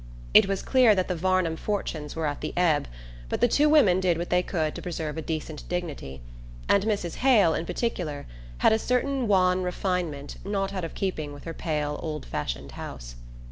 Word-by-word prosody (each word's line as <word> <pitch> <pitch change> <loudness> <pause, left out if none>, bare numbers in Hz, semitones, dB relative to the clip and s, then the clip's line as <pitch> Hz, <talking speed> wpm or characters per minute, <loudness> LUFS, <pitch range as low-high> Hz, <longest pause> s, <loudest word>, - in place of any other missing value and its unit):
It - - +8
was 195 -1 -2
clear 250 -5 +5
that 185 -1 0
the 185 - 0
Varnum 185 -1 +1
fortunes 160 -7 -3
were 160 -1 -2
at 145 -1 -2
the 155 - -4
ebb, 165 - +2 0.4
but - - -1
the 240 - +5
two 295 +5 +3
women 215 -13 +5
did 180 -3 +2
what 170 +1 -4
they 180 0 +4
could 160 -4 -1
to - - -7
preserve 160 -4 -4
a 160 - -3
decent 155 -1 -5
dignity; 150 - -4 0.5
and 200 0 +3
Mrs. 200 -6 -1
Hale, 225 -11 +5
in 165 - -3
particular, 170 -11 -3 0.3
had - - +4
a 220 - +2
certain 250 +1 0
wan 185 -2 +3
refinement 180 -5 -2
not 195 0 -2
out 185 -2 -3
of 165 - -5
keeping 155 -7 -3
with 145 - -11
her 165 - -5
pale 150 -2 -2
old 155 -2 -4
fashioned 70 -1 -4
house. - - -8
175 Hz, 195 wpm, -26 LUFS, 155-195 Hz, 0.5 s, It